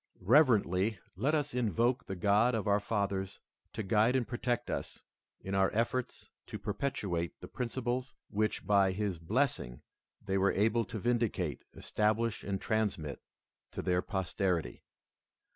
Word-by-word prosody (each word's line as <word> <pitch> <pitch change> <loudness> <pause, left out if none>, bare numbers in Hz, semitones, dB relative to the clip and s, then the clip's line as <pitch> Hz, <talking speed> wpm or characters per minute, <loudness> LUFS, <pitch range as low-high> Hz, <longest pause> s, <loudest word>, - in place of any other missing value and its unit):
Reverently 110 - +4 0.2
let 135 - +1
us 145 -1 -1
invoke 120 +2 +1
the 95 - -3
God 105 +6 +3
of 110 -1 -2
our 100 0 +4
fathers 100 -2 -2 0.3
to 110 - -3
guide 110 +5 +3
and 125 -3 +1
protect 120 0 -2
us - - -5 0.4
in 95 - -5
our 95 0 +3
efforts 120 +2 -2 0.2
to - - -5
perpetuate 100 - -2
the - - -9
principles 125 +1 -3
which 110 +1 -1
by 100 -2 +4
his 100 -3 -2
blessing 100 - -1 0.4
they 95 0 -1
were 100 +1 +3
able 110 +3 +2
to 105 - -6
vindicate, 110 - 0
establish, 110 +1 0
and 100 -1 -2
transmit 100 - -1 0.5
to - - -4
their 90 -1 +2
posterity. 90 - -1
105 Hz, 140 wpm, -32 LUFS, 95-120 Hz, 0.5 s, Reverently